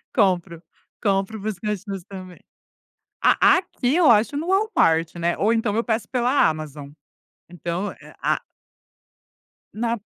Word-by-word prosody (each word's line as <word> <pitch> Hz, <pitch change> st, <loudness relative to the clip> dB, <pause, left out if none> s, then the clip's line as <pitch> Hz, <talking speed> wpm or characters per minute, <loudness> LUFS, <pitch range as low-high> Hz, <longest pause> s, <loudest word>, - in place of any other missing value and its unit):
Compro, 180 Hz, -3 st, +1 dB, 0.4 s
compro 200 Hz, +1 st, 0 dB
para 215 Hz, +2 st, -2 dB
os 200 Hz, -, -8 dB
cachorros 205 Hz, -2 st, -4 dB
também. 185 Hz, -2 st, -10 dB, 0.8 s
A -, -, +5 dB
aqui 280 Hz, -6 st, -1 dB
eu 340 Hz, -7 st, +5 dB
acho 230 Hz, +6 st, +3 dB
no 315 Hz, +4 st, -3 dB
Walmart, 370 Hz, -, +2 dB
né, 170 Hz, 0 st, 0 dB
ou 210 Hz, -, +2 dB
então 225 Hz, -2 st, 0 dB
eu 230 Hz, -, +2 dB
peço 225 Hz, -1 st, -1 dB
pela 250 Hz, +2 st, +2 dB
Amazon, 150 Hz, -2 st, -7 dB, 0.6 s
então 175 Hz, +3 st, -3 dB
é -, -, -16 dB
a -, -, +1 dB, 1.3 s
Na 235 Hz, +1 st, -1 dB
205 Hz, 135 wpm, -23 LUFS, 175-235 Hz, 1.3 s, A